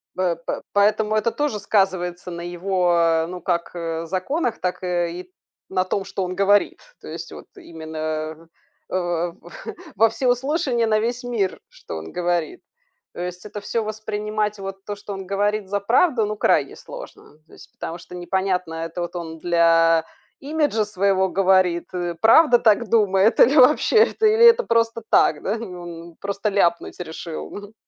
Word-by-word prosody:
П 180 -2 0
п 170 - -5
поэтому 210 +1 +2
это 215 +2 +1
тоже 290 -7 -2
сказывается 185 -3 0
на 170 0 -6
его 175 -2 +1
ну 180 0 -7
как, 170 -2 -1
э, 165 -1 -4
законах, 225 - -2
так, 180 0 -3
э, 175 -1 -1
и 180 +1 -9 0.4
на 185 -1 0
том, 195 +1 -2
что 195 - -3
он 185 0 -4
говорит. 200 +2 +2 0.2
То - - -11
есть - - -7
вот - - -10
именно, 160 - -6 0.4
э, - - -10
в 175 -1 -1 0.6
во 225 +3 +5
всеуслышание, 250 +1 0
на 215 -1 +2
весь 240 +3 -2
мир, 230 -6 -2
что - - -9
он 80 0 -8
говорит. 175 - -2 0.5
То - - -7
есть 180 +1 -6
это 210 0 -7
всё 225 +2 -2
воспринимать, 215 0 -3
вот 195 0 -7
то, 205 - -4
что 205 0 -8
он 195 -1 -7
говорит, 205 0 -1
за 205 +1 0
правду, 240 - +3
ну 210 0 -4
крайне - - +2
сложно. - - -12
То - - -21
есть, - - -15
потому 165 - -6
что 180 - -12
непонятно, 180 -1 -2
это 165 +2 -5
вот 175 +1 -5
он 160 -1 -6
для 165 -1 +3 0.3
имиджа 290 -7 0
своего 195 -1 +1
говорит 185 -2 +2
и 175 -1 -3
правда 245 +3 +6
так 225 0 +3
думает, 205 -1 +3
или 275 +6 +6
вообще 290 - +5
это 440 - -2
или 440 +2 +5
это 470 +1 +7
просто 230 - +1
так, 150 - +3
да, 205 - -1
и - - -6
он 175 -5 -9
просто 200 +1 -2
ляпнуть 175 -5 0
решил, 165 -1 -6
мгм. 205 +1 -9
190 Hz, 170 wpm, -22 LUFS, 175-215 Hz, 0.6 s, это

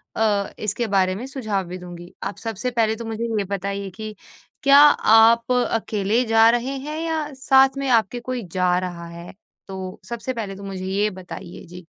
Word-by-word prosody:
अ, 205 -3 +1
इसके 215 +2 -2
बारे 190 -2 +2
में 240 +6 -6
सुझाव 215 -8 -2
भी 180 +1 -6
दूँगी। 175 -1 -11
आप 195 - -4
सबसे 225 +2 -4
पहले 220 -2 +1
तो 230 0 -7
मुझे 225 +1 -4
ये 205 - +1
बताइए 200 0 -4
कि 215 0 -7 0.5
क्या 280 +1 +7
आप 230 -4 +6
अकेले 225 -2 +1
जा 225 0 +5
रहे 245 +3 0
हैं 300 +3 -5
या 320 -1 -1
साथ 265 +1 +4
में 275 -1 -2
आपके 235 0 +2
कोई 245 -1 -4
जा 180 -1 +2
रहा 175 -2 -6
है? 170 +1 -10 0.3
तो 190 -1 -7
सबसे 235 +2 -4
पहले 205 -4 -5
तो 200 - -11
मुझे 190 -1 -6
ये 200 +3 0
बताइए? 180 -1 -10
जी। 175 0 -12
215 Hz, 185 wpm, -22 LUFS, 190-240 Hz, 0.5 s, क्या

